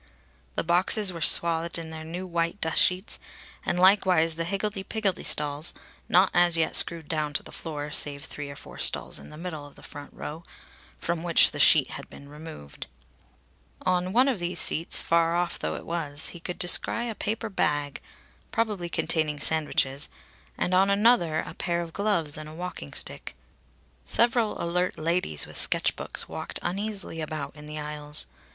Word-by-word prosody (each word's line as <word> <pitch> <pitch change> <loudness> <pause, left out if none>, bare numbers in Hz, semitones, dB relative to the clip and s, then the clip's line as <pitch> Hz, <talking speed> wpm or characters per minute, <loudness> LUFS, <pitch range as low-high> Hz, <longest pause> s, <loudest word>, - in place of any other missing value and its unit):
The - - 0
boxes 185 +3 +4
were 165 - -8
swathed 170 +1 +3
in 165 -1 -7
their 160 0 -7
new 175 +4 -6
white 170 +1 -2
dust 160 -3 +4
sheets; 185 +3 +1 0.4
and 175 - -1
likewise 185 -4 +4
the 165 +1 -3
higgledy 195 +2 -2
piggledy 195 -2 -2
stalls, 150 +2 +1 0.3
not 185 +3 +4
as 175 -1 +4
yet 160 -1 +1
screwed 165 -3 +4
down 150 -2 -2
to - - -1
the - - -12
floor, 150 -2 -6
save 145 -1 +2
three 145 -1 -7
or 140 - -8
four - - -12
stalls - - +1
in - - -10
the 150 - -11
middle 160 -3 -6
of 145 - -13
the - - -16
front 145 -1 -10
row, 155 +3 -7 0.6
from 170 -1 -3
which 170 -1 +4
the - - -6
sheet - - +6
had - - -8
been 140 - -13
removed. 150 - -10 1.0
On 180 0 0
one 250 +6 +4
of 255 -8 0
these 175 0 +1
seats, 165 - +4
far 170 0 +2
off 175 0 -1
though 80 0 -3
it - - -8
was, 155 -3 -3
he 175 - -9
could 180 +1 -5
descry 230 +6 +3
a 230 - -3
paper 220 +2 -3
bag, 145 -7 -1 0.5
probably 210 -6 -1
containing 155 -3 -1
sandwiches, 145 -3 0 0.5
and 180 - -1
on 190 +2 +4
another 200 -6 +3
a - - -8
pair 170 -2 -2
of 170 -1 -6
gloves 175 -8 -1
and 155 0 -8
a 155 - -11
walking 175 - -7
stick. - - -7 0.7
Several 230 - +1
alert 180 +2 -1
ladies 165 - 0
with - - -9
sketchbooks - - +2
walked - - -4
uneasily 195 -2 -4
about 150 -2 -5
in 150 0 -11
the 150 0 -7
aisles. 150 0 -3
170 Hz, 175 wpm, -26 LUFS, 150-185 Hz, 1.0 s, sheet